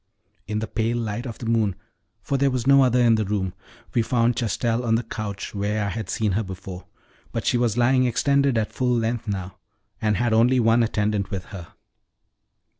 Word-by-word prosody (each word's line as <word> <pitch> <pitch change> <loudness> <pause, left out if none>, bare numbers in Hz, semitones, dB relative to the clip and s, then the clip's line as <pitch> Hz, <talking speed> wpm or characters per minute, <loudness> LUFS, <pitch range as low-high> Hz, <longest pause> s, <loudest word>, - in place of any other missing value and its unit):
In 105 - -2
the 110 +1 -2
pale 115 +2 -1
light 115 +2 -3
of 115 - -7
the - - -7
moon 110 -4 +1 0.5
for 140 - -1
there 140 0 +3
was 125 -2 -2
no 140 0 +6
other 125 -1 +3
in 120 -2 +5
the 110 -1 +2
room 95 -3 -2 0.4
we 120 - +3
found 115 +1 +1
Chastel 115 +1 -1
on 115 -2 +2
the 115 - 0
couch 100 -4 -5
where 105 +1 -1
I - - -1
had 110 +3 -5
seen 110 -2 0
her 100 +4 +1
before, 95 -2 -8 0.5
but - - -3
she - - +2
was 120 -2 +1
lying 130 +1 +3
extended 140 +1 +2
at 110 -1 -1
full 125 -1 +1
length 115 0 -2
now, 95 -3 -4 0.4
and 105 -2 +1
had 120 -2 +1
only 120 +3 +4
one 115 0 +4
attendant 105 -3 0
with 95 -3 -4
her. 90 -4 -9
115 Hz, 200 wpm, -24 LUFS, 105-120 Hz, 0.5 s, no